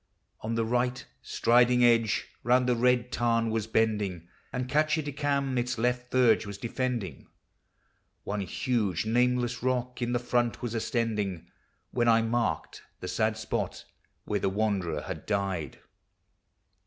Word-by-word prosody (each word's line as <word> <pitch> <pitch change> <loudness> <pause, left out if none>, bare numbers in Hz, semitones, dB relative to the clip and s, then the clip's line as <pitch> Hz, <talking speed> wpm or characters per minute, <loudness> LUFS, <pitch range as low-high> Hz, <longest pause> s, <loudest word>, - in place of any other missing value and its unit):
On 115 +1 -3
the 115 0 +1
right, 125 +2 0 0.2
Striden 125 +1 +3
Edge 115 -3 +3 0.2
round 125 +2 +3
the 125 - +3
Red 125 0 +2
Tarn 115 -1 +1
was 110 -1 -1
bending, 105 -6 0 0.2
And 125 0 -3
Catchedicam 145 -2 0
its 125 0 -2
left 125 +1 -1
verge 120 -4 +4
was 100 -1 -6
defending, 115 - -3 1.0
One 105 0 -3
huge 105 -2 -1
nameless 125 +1 +1
rock 125 0 -1
in 120 0 0
the 120 - +2
front 120 -1 0
was 120 -2 -3
aSCend 110 -6 -1 0.5
When 120 -1 +1
1 115 0 +4
marked 120 -1 -1 0.2
the 90 - -6
sad 110 +3 0
spot 110 - -3 0.4
where 105 - -1
the 95 - +1
wan 105 0 +1
derer 80 -4 -3
had 90 -5 -7
died. 100 -6 -2
115 Hz, 140 wpm, -28 LUFS, 105-125 Hz, 1.0 s, verge